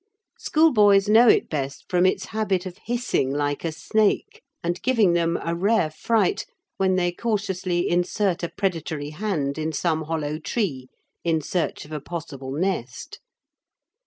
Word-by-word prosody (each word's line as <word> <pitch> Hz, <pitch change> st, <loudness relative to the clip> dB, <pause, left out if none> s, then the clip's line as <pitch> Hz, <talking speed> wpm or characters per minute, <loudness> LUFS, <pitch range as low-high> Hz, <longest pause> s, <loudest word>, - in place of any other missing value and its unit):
Schoolboys 210 Hz, -11 st, +4 dB
know 225 Hz, +3 st, +6 dB
it -, -, +5 dB
best 140 Hz, -3 st, -4 dB
from 180 Hz, 0 st, +3 dB
its 185 Hz, 0 st, 0 dB
habit 200 Hz, -4 st, 0 dB
of 185 Hz, +1 st, -8 dB
hissing 240 Hz, -, 0 dB
like 145 Hz, 0 st, -1 dB
a 165 Hz, -, -1 dB
snake 215 Hz, -, 0 dB, 0.2 s
and 175 Hz, +1 st, -2 dB
giving 225 Hz, -8 st, +3 dB
them 170 Hz, 0 st, +1 dB
a 165 Hz, -, -1 dB
rare 190 Hz, -2 st, +2 dB
fright 215 Hz, +5 st, 0 dB, 0.3 s
when 190 Hz, -1 st, +2 dB
they 175 Hz, -1 st, +1 dB
cautiously 190 Hz, -4 st, -1 dB
insert 180 Hz, +1 st, 0 dB
a 170 Hz, -, -2 dB
predatory 160 Hz, -6 st, -3 dB
hand 155 Hz, -6 st, -2 dB
in 155 Hz, +1 st, -1 dB
some 160 Hz, +1 st, -1 dB
hollow 155 Hz, -1 st, -2 dB
tree 155 Hz, -, -2 dB, 0.3 s
in 165 Hz, -2 st, +1 dB
search 165 Hz, +2 st, -2 dB
of 150 Hz, -, -15 dB
a 155 Hz, -, -3 dB
possible 155 Hz, -5 st, -7 dB
nest. 175 Hz, -, -3 dB
175 Hz, 150 wpm, -24 LUFS, 155-205 Hz, 0.3 s, know